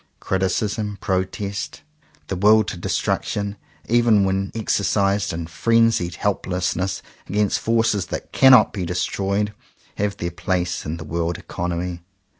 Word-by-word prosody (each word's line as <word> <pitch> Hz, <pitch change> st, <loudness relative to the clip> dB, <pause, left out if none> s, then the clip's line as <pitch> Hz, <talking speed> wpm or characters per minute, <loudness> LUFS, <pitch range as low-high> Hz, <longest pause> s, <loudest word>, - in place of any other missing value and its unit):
Criticism, 100 Hz, +2 st, -1 dB
pro 95 Hz, 0 st, +1 dB
test, 100 Hz, 0 st, -6 dB, 0.4 s
the 95 Hz, -, -3 dB
will 105 Hz, +4 st, +5 dB
to 100 Hz, -, -5 dB
destruction, 100 Hz, +3 st, -1 dB, 0.3 s
even 115 Hz, -3 st, +4 dB
when 95 Hz, 0 st, 0 dB
exercised 100 Hz, -1 st, +1 dB
in 85 Hz, -1 st, -4 dB
frenzied 115 Hz, 0 st, +2 dB
helplessness 95 Hz, -1 st, -1 dB, 0.3 s
against 105 Hz, 0 st, +1 dB
forces 110 Hz, -4 st, +1 dB
that -, -, -6 dB
cannot 130 Hz, -2 st, +6 dB
be 95 Hz, -, -3 dB
destroyed, 100 Hz, +4 st, -1 dB, 0.4 s
have 105 Hz, 0 st, -1 dB
their 85 Hz, 0 st, -3 dB
place 90 Hz, -1 st, -2 dB
in 80 Hz, +2 st, -3 dB
the 80 Hz, -, -7 dB
world 85 Hz, +1 st, -2 dB
economy. 85 Hz, 0 st, -4 dB
95 Hz, 125 wpm, -22 LUFS, 90-105 Hz, 0.4 s, cannot